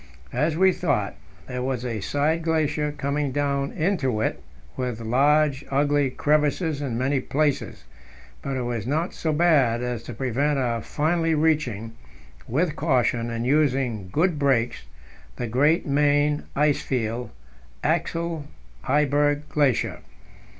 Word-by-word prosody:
As 150 Hz, +5 st, 0 dB
we 190 Hz, +1 st, +5 dB
thought, 140 Hz, -, -1 dB, 0.3 s
there 125 Hz, 0 st, -4 dB
was 125 Hz, -1 st, -2 dB
a 115 Hz, -3 st, -2 dB
side 150 Hz, +9 st, 0 dB
glacier 155 Hz, -2 st, 0 dB
coming 145 Hz, 0 st, -2 dB
down 140 Hz, 0 st, -1 dB
into 155 Hz, -, 0 dB
it, 110 Hz, -, -1 dB, 0.3 s
with 125 Hz, -3 st, -3 dB
large, 140 Hz, +5 st, +2 dB
ugly 145 Hz, 0 st, +2 dB
crevasses 150 Hz, +2 st, +1 dB
in 125 Hz, -5 st, -2 dB
many 135 Hz, +2 st, +1 dB
places; 145 Hz, +2 st, -1 dB, 0.6 s
but 135 Hz, -1 st, -3 dB
it 125 Hz, -, -2 dB
was 120 Hz, -2 st, -3 dB
not 160 Hz, +6 st, -1 dB
so 160 Hz, -, -2 dB
bad 145 Hz, -8 st, +3 dB
as 125 Hz, -2 st, -3 dB
to 120 Hz, +1 st, -8 dB
prevent 135 Hz, +4 st, 0 dB
our 120 Hz, -3 st, 0 dB
finally 165 Hz, +4 st, 0 dB
reaching, 150 Hz, -9 st, 0 dB, 0.6 s
with 155 Hz, +6 st, 0 dB
caution 125 Hz, -6 st, +1 dB
and 115 Hz, 0 st, -3 dB
using 130 Hz, -8 st, +1 dB
good 165 Hz, -, +1 dB
brakes, 125 Hz, -, +1 dB, 0.5 s
the 120 Hz, -, -3 dB
great 140 Hz, +8 st, +2 dB
main 145 Hz, +1 st, +2 dB
ice 145 Hz, 0 st, +2 dB
field 120 Hz, -1 st, -2 dB, 0.5 s
Axel 165 Hz, -1 st, -1 dB, 0.4 s
Heiberg 145 Hz, +1 st, +2 dB
Glacier. 145 Hz, -5 st, +1 dB
140 Hz, 130 wpm, -24 LUFS, 125-150 Hz, 0.6 s, we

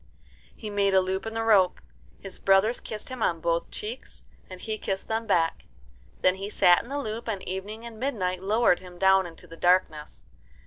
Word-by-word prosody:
He 215 Hz, -2 st, -7 dB
made 200 Hz, -1 st, +2 dB
a -, -, +7 dB
loop 190 Hz, +3 st, -2 dB
in 225 Hz, -, -6 dB
the 225 Hz, -, -1 dB
rope. 200 Hz, -5 st, +4 dB, 0.4 s
His 195 Hz, -, -10 dB
brothers 195 Hz, +5 st, +3 dB
kissed 215 Hz, +3 st, -8 dB
him 255 Hz, -2 st, -7 dB
on 170 Hz, -5 st, +1 dB
both 170 Hz, 0 st, -1 dB
cheeks, 225 Hz, +5 st, -7 dB, 0.3 s
and 185 Hz, -1 st, -9 dB
he 215 Hz, +2 st, -4 dB
kissed 195 Hz, 0 st, -3 dB
them 225 Hz, 0 st, -2 dB
back. 165 Hz, -5 st, +1 dB, 0.6 s
Then 185 Hz, +1 st, +3 dB
he 195 Hz, +1 st, -5 dB
sat 180 Hz, -4 st, +5 dB
in 240 Hz, -, -14 dB
the 280 Hz, -, -3 dB
loop, 230 Hz, -4 st, -4 dB
and 200 Hz, -4 st, -4 dB
Evening 205 Hz, +5 st, -5 dB
and 230 Hz, -2 st, -9 dB
Midnight 185 Hz, -9 st, -2 dB
lowered 210 Hz, -1 st, +3 dB
him 180 Hz, -1 st, -12 dB
down 190 Hz, 0 st, +4 dB
into 170 Hz, +1 st, -13 dB
the 165 Hz, -1 st, -12 dB
darkness. 175 Hz, -4 st, +1 dB
195 Hz, 195 wpm, -26 LUFS, 185-220 Hz, 0.6 s, a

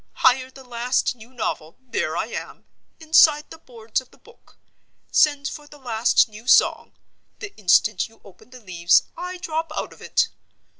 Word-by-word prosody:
Hire 255 Hz, 0 st, +2 dB
the 265 Hz, 0 st, -14 dB
last 250 Hz, +1 st, -1 dB
new 235 Hz, +1 st, -16 dB
novel, 165 Hz, -10 st, -4 dB
there 260 Hz, -1 st, -3 dB
I -, -, -1 dB
am, -, -, -8 dB, 0.3 s
inside 310 Hz, -1 st, +4 dB
the 325 Hz, -, -11 dB
boards 230 Hz, -5 st, -4 dB
of 255 Hz, -, -21 dB
the -, -, -22 dB
book. -, -, -22 dB, 0.5 s
Send 290 Hz, -2 st, +3 dB
for 295 Hz, -1 st, -8 dB
the 295 Hz, -, -15 dB
last 240 Hz, -4 st, +2 dB
new 215 Hz, +2 st, -14 dB
Song—the 405 Hz, +8 st, 0 dB
instant 205 Hz, +1 st, +2 dB
you 225 Hz, -, -23 dB
open 200 Hz, +4 st, -18 dB
the 255 Hz, 0 st, -13 dB
leaves, 175 Hz, -4 st, +3 dB
I 360 Hz, +1 st, -6 dB
drop 325 Hz, -2 st, -4 dB
out -, -, -4 dB
of -, -, -19 dB
it. -, -, +1 dB
255 Hz, 165 wpm, -22 LUFS, 220-295 Hz, 0.5 s, inside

